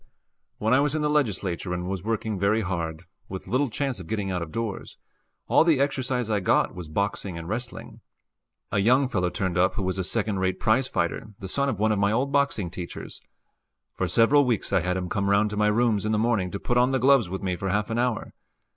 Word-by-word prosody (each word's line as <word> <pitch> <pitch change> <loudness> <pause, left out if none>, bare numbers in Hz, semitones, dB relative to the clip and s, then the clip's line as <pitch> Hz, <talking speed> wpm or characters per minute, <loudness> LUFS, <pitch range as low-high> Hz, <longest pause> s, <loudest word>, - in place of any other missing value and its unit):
When 110 +3 +1
I 130 - +5
was 145 +1 +1
in 155 - 0
the 150 - +1
Legislature 100 - -1
and 90 0 -4
was 95 -1 -3
working 110 -2 -2
very 105 +3 +2
hard, 85 -4 -3 0.3
with 95 -1 -6
little 130 +2 +1
chance 135 -1 -2
of 90 - -9
getting 100 -2 -2
out 90 -1 -2
of 80 -2 -6
doors, 115 -3 -4 0.5
all - - +5
the 160 -5 +3
exercise 130 -3 0
I 105 -2 +1
got 90 - +2
was 90 -3 -8
boxing 100 +1 -2
and 85 0 -7
wrestling. 120 +5 -6 0.7
A - - +1
young 130 +7 +4
fellow 90 -8 0
turned 90 -1 -2
up 95 +1 +3
who 100 - -2
was 95 +1 -1
a - - 0
second 105 0 -1
rate 95 0 0
prize 125 +4 +2
fighter, 105 -2 -2
the 95 - -7
son 140 +8 0
of 115 - -2
one 110 +2 +2
of 105 - +1
my 100 +1 +2
old 130 +5 0
boxing 140 - +1
teachers. 85 -1 -8 0.7
For 95 - -1
several 115 - +4
weeks 120 -6 -1
I - - +5
had 90 +1 -1
him 90 -1 -3
come 100 +1 -1
round 100 +1 +3
to - - -3
my 105 0 +3
rooms 110 -1 +2
in 110 - -1
the - - +2
morning 110 -4 +1
to 100 - -5
put 120 0 +1
on 125 +1 +4
the 135 - +1
gloves 130 -5 +4
with 95 +2 -5
me 90 -2 -1
for 95 +2 -3
half 105 +3 0
an 115 - 0
hour. 120 -3 -1
105 Hz, 235 wpm, -25 LUFS, 95-125 Hz, 0.7 s, I